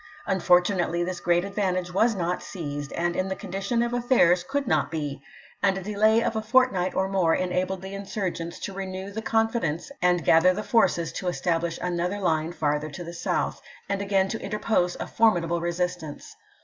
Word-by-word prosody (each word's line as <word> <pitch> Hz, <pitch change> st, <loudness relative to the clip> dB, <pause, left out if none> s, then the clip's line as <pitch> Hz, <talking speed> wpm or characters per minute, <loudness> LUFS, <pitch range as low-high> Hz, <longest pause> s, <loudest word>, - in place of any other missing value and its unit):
Unfortunately 180 Hz, -2 st, +2 dB
this 180 Hz, 0 st, -3 dB
great 175 Hz, +1 st, +2 dB
advantage 185 Hz, -3 st, -1 dB
was 225 Hz, +4 st, +3 dB
not 180 Hz, -1 st, -1 dB
seized, 145 Hz, -5 st, -6 dB
and 175 Hz, 0 st, -1 dB
in 185 Hz, -, 0 dB
the 190 Hz, -, -2 dB
condition 200 Hz, +5 st, -2 dB
of 240 Hz, 0 st, -2 dB
affairs 235 Hz, -8 st, +3 dB
could 280 Hz, +9 st, -2 dB
not -, -, +1 dB
be; 145 Hz, -4 st, -4 dB, 0.4 s
and 195 Hz, -1 st, +2 dB
a 190 Hz, -, -5 dB
delay 215 Hz, +3 st, +3 dB
of 225 Hz, -, -1 dB
a 220 Hz, -, 0 dB
fortnight 215 Hz, -5 st, +2 dB
or 190 Hz, 0 st, +1 dB
more 185 Hz, -4 st, +2 dB
enabled 185 Hz, +1 st, -1 dB
the 190 Hz, +1 st, -7 dB
insm 195 Hz, -1 st, -3 dB
gents 170 Hz, 0 st, -6 dB
to 200 Hz, -, -6 dB
renew 190 Hz, 0 st, -5 dB
the 220 Hz, +2 st, -4 dB
confidence 225 Hz, -, 0 dB
and 180 Hz, -2 st, +2 dB
gather 180 Hz, +3 st, +5 dB
the 210 Hz, -, -3 dB
forces 215 Hz, -9 st, +2 dB
to 185 Hz, -, -5 dB
establish 170 Hz, -1 st, -1 dB
another 180 Hz, +2 st, -1 dB
line 160 Hz, -3 st, 0 dB
farther 150 Hz, -2 st, -1 dB
to 175 Hz, +4 st, -7 dB
the 170 Hz, 0 st, -8 dB
south, 170 Hz, -, -2 dB, 0.3 s
and 200 Hz, 0 st, -1 dB
again 195 Hz, -1 st, +2 dB
to 220 Hz, -, -4 dB
interpose 210 Hz, -4 st, 0 dB
a -, -, -3 dB
formidable 170 Hz, -7 st, +2 dB
resistance. 175 Hz, -2 st, -3 dB
185 Hz, 185 wpm, -26 LUFS, 170-200 Hz, 0.4 s, gather